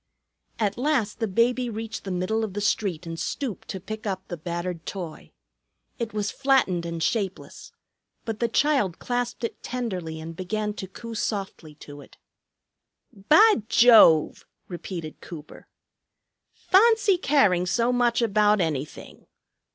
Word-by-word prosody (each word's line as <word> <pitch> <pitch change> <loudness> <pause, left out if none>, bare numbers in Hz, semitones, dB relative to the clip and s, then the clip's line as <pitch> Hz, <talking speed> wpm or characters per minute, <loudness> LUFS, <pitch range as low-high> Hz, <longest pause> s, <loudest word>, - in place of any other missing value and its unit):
At 210 -1 -1
last 260 -7 0
the 225 - 0
baby 240 +5 +1
reached 225 -1 -6
the - - -5
middle 185 +5 -1
of 210 -4 -4
the - - -1
street 185 -5 -1
and 165 0 -6
stooped 260 -8 -4
to 190 - -5
pick 215 +3 -7
up 190 -1 -4
the 175 - -4
battered 170 +1 -5
toy. 175 -5 -7 0.7
It 230 -2 -3
was 210 -1 -2
flattened 260 -11 +1
and 170 -1 -4
shapeless, 195 -5 -3 0.5
but 225 -2 -4
the 235 - +1
child 230 - +1
clasped 245 -1 -3
it 230 - -4
tenderly 185 -10 -4
and 165 +1 -8
began 210 +4 -3
to 190 - -7
coo 230 +5 -9
softly 195 -8 -4
to 145 -1 -12
it. - - -17 1.0
"Bah 310 - +5
Jove!" 220 -10 +6 0.2
repeated 170 -3 -7
Cooper. 155 -3 -11 0.9
"Fahncy 415 -2 +3
caring 200 - +3
so 235 +6 +1
much 240 -1 +2
about 210 -1 +3
anything! 155 -4 -4
210 Hz, 140 wpm, -25 LUFS, 175-235 Hz, 1.0 s, Jove